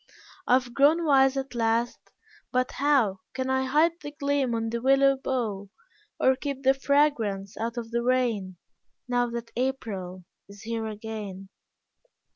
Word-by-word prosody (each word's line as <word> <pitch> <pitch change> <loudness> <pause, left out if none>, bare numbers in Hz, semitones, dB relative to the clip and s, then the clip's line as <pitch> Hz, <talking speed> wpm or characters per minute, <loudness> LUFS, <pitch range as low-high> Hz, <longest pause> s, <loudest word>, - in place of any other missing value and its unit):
I - - +4
have 250 -1 +2
grown 310 +6 +4
wise 270 -2 +4
at 270 -1 -4
last 230 0 -1 0.4
but 255 0 0
how 255 -9 +2 0.2
Can 260 0 -1
I 265 0 +1
hide 315 +5 +2
the 290 - -6
gleam 285 -4 -1
on 225 0 -2
the 235 0 -3
willow 275 +1 +4
bough, 225 -7 -3 0.5
Or 260 - +4
keep 275 0 -5
the 265 0 +5
fragrance 270 -9 +1
out 230 +2 -4
of 230 -1 -5
the 235 0 0
rain 235 -7 0 0.5
Now 245 -1 +1
that 235 0 -6
April 205 -8 -3 0.3
is 200 0 -13
here 225 0 -3
again? 210 -3 -7
245 Hz, 150 wpm, -26 LUFS, 225-270 Hz, 0.5 s, the